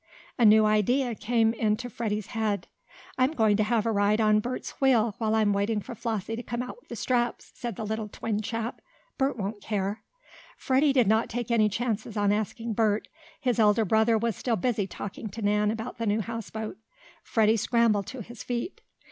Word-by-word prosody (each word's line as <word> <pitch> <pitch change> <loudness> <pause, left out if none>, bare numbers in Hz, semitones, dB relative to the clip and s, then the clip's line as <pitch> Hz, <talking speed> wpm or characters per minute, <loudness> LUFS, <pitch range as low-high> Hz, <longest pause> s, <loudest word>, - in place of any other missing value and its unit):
A 235 - +5
new 215 0 +7
idea 235 +4 +2
came 225 +1 +1
into 220 +1 0
Freddie's 215 -3 -3
head. 210 -5 -1 0.5
"I'm 260 +4 +3
going 220 -6 +3
to 215 - +3
have 220 0 +1
a 230 - +1
ride 205 +1 +2
on 215 -1 +4
Bert's 245 +4 -4
wheel, 235 -5 +4
while 220 -1 +1
I'm 215 -2 +3
waiting 205 +2 0
for 210 - -8
Flossie 225 -1 -3
to 235 - -5
come 240 0 -3
out 250 - -8
with - - -31
the - - -5
straps," 240 -2 -1
said 240 -4 -5
the 220 - -5
little 220 0 -3
twin 210 0 -3
chap. 230 +2 -4 0.4
"Bert 270 -2 +1
won't 205 0 -4
care." 205 0 -2 0.6
Freddie 275 +2 +3
did 255 -3 +4
not 220 +3 +2
take 240 0 -3
any 215 -2 +4
chances 225 0 -2
on 205 -1 +3
asking 220 +2 -2
Bert. 215 -1 +1 0.3
His 245 -2 0
elder 215 0 +4
brother 220 +3 +3
was 230 -1 -1
still 235 +3 -1
busy 215 -2 0
talking 205 +2 -6
to 220 +3 -7
Nan 210 +1 +2
about 225 +2 -4
the 230 - -1
new 210 +2 +2
houseboat. 220 -1 -5 0.5
Freddie 220 -1 +3
scrambled 220 -2 +2
to 260 - -6
his 240 +4 -11
feet. 245 +9 -4
220 Hz, 195 wpm, -27 LUFS, 210-235 Hz, 0.6 s, new